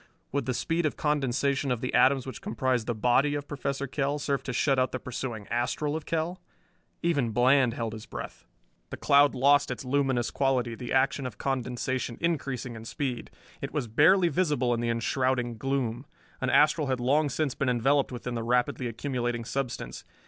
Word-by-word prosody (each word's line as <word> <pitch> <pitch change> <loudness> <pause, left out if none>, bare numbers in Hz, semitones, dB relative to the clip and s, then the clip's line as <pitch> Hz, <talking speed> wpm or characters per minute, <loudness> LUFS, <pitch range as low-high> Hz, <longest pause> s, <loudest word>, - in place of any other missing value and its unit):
Would 140 -3 -2
the 130 - 0
speed 165 +3 0
of - - -5
condensation 140 -1 0
of 125 -2 0
the 125 - -3
atoms 130 +1 +4
which 130 - -7
comprised 130 - -1
the 120 - -1
body 125 +6 +2
of 145 0 -4
Professor 140 -1 -3
Kell 140 +1 -1
serve 140 -1 -1
to 135 - -2
shut 135 +2 +2
out 130 - +1
the - - 0
pursuing 120 -4 -5
astral 125 +5 -1
of 160 - -5
Kell? 165 +3 -2 0.6
Even 145 -8 +1
Bland 125 +2 +3
held 115 -2 -3
his 110 0 -9
breath! - - -8 0.5
The - - -6
cloud 140 0 +4
lost 145 +3 +4
its - - -5
luminous 130 -2 +1
quality, 130 -4 +1
the 120 +1 -7
action 130 0 +2
of 110 -5 -9
condensation 125 -2 -2
increasing 135 -7 -2
in 110 0 -9
speed. 125 0 -3 0.3
It - - -5
was 140 -5 -1
barely 170 - +5
visible 145 -7 +1
in 115 - -1
the 120 0 -1
enshrouding 120 0 0
gloom. 135 0 -2 0.3
An 130 - 0
astral 150 +2 +4
had 130 -1 0
long 145 +5 +2
since 140 +1 -1
been 140 - -1
enveloped 135 +4 +2
within 125 0 -5
the 115 - -2
rapidly 125 +2 0
accumulating 120 -1 -3
substance. 130 -1 -4
130 Hz, 185 wpm, -28 LUFS, 120-145 Hz, 0.6 s, barely